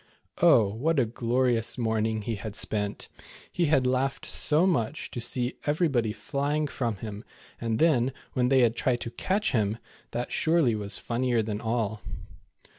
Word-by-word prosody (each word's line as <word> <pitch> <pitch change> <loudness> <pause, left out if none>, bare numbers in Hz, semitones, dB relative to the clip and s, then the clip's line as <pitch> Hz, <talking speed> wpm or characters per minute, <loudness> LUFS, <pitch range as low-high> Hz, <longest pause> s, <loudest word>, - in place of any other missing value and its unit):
Oh, 155 -10 +6
what 135 +10 0
a 125 - +3
glorious 120 +1 0
morn 110 -2 0
ing 110 -1 -2
he 115 - -2
had 105 0 -6
spent. 105 -1 -2 0.4
He 175 -2 +1
had 140 -4 +3
laughed 130 +2 0
so 155 +3 +4
much 155 -5 -1
to 120 - -5
see 125 +1 -1
everybody 145 -8 +1
fiying 145 +6 -1
from 120 -6 -2
him, 105 +1 -7 0.4
and 115 -1 -1
then, 135 -4 +3 0.2
when 125 -1 +1
they 135 -1 +5
had 115 -1 +3
tried 120 0 0
to 115 - -5
catch 200 - -1
him, 110 -2 0 0.3
that 120 +1 -4
surely 160 -7 +2
was 105 -1 -3
fun 120 +1 -3
nier 120 -3 +2
than 105 -1 -4
all. 110 -2 -1
120 Hz, 170 wpm, -27 LUFS, 110-140 Hz, 0.4 s, Oh